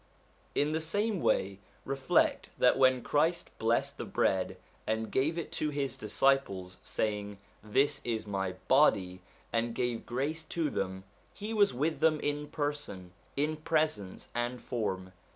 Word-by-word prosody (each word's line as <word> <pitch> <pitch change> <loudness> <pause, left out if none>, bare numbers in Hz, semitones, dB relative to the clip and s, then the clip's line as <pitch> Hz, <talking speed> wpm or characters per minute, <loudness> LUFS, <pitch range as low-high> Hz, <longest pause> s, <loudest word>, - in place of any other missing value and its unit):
In 145 +1 +2
the 160 +1 0
same 205 +4 0
way, 95 0 +1 0.3
reflect 135 -1 +2
that - - +5
when 130 -1 +4
Christ 160 +4 +1
blessed 115 +1 +1
the - - -2
bread 95 0 +1 0.3
and 110 0 -1
gave 155 +6 +1
it 170 - -4
to 155 - -1
his 140 -3 -2
disciples 105 -5 +1
saying, 105 -1 -2 0.2
' - - -33
This 140 +2 +3
is 115 -2 -2
my 95 -2 -2
body,' 95 -10 +4 0.3
and 115 0 0
gave 120 -2 -1
grace 145 +6 -2
to 160 -2 -1
them, 95 0 -2 0.3
he 210 +2 -4
was 205 -2 +5
with 155 +6 -1
them 155 -1 +4
in 145 0 -2
person, 145 - -4 0.3
in 155 +2 +1
presence, 155 - -1
and 120 +1 -2
form. 95 -7 -3
130 Hz, 150 wpm, -31 LUFS, 105-155 Hz, 0.3 s, that